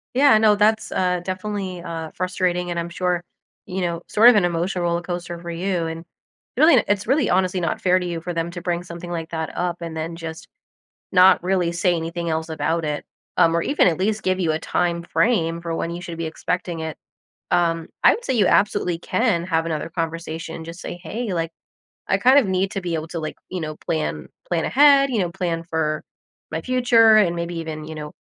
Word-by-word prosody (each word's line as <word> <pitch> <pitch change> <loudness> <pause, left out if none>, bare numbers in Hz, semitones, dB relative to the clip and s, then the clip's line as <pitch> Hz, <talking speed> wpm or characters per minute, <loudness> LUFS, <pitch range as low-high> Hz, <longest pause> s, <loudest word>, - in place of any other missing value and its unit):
Yeah, 270 -4 +6
no. 215 -1 +5
That's, 220 +2 +2
uh, 180 -1 0
definitely, 185 -1 -4
uh, 165 -2 -6
frustrating, 180 -1 -1
and 170 -1 -2
I'm 170 0 -4
sure, 180 0 -1 0.4
you 185 +1 -4
know, 170 -1 -2
sort 225 +3 +7
of 245 - +5
an 200 -4 +4
emotional 175 +1 -1
roller 170 0 0
coaster 175 -1 -5
for 170 0 -8
you, 170 -1 -1
and 165 +1 -6 0.5
really 310 +3 +6
n 245 - +4
it's 205 0 0
really 270 -1 +2
honestly 185 0 +2
not 170 - -2
fair 185 0 +4
to 180 - -2
you 170 -2 -4
for 175 - -4
them 165 +1 -2
to 175 0 -7
bring 175 0 -2
something 175 0 -8
like 165 -2 -4
that 160 -1 -3
up 175 -1 -1
and 165 -1 -5
then 165 +1 -4
just 165 -1 -8 0.7
not 185 0 +6
really 180 -2 +1
say 175 +1 +1
anything 170 +1 -3
else 160 0 -2
about 160 +1 -1
it, 150 -1 -3 0.3
um, 165 0 +4
or 170 - +2
even 285 - +3
at 165 - +1
least 210 +3 -1
give 185 0 +1
you 170 -4 +1
a 155 - -1
time 170 0 -1
frame 170 -4 +1
for 170 -1 -4
when 165 - -2
you 170 +1 -5
should 170 -2 -7
be 165 - -3
expecting 170 +2 -3
it. 160 -1 -5 0.5
Um, 165 -1 +1 0.2
I - - +8
would 480 - -7
say 260 - 0
you 215 - +3
absolutely 200 -4 +2
can 195 -1 0
have 165 -2 0
another 165 0 -3
conversation, 165 -1 -4
just 165 +2 -9
say, - - -6
"Hey," 215 +5 -4
like, 165 -1 -1 0.6
"I - - +2
kind 260 +3 +6
of 275 - +5
need 190 +1 +1
to 195 - -3
be 175 -2 -3
able 160 0 -2
to, 165 - -4
like, 155 -1 -5
you 180 -1 -4
know, 155 -1 -5
plan 160 -2 -3 0.2
plan - - 0
ahead, 280 0 +5
you 235 - 0
know, 175 -3 0
plan 170 -2 -2
for 160 -2 -2 0.5
my 160 +1 -2
future 235 -1 +5
and 185 -5 +4
maybe 170 0 -4
even, 160 -2 -5
you 160 0 -7
know, 150 -1 -7
175 Hz, 220 wpm, -22 LUFS, 165-190 Hz, 0.7 s, I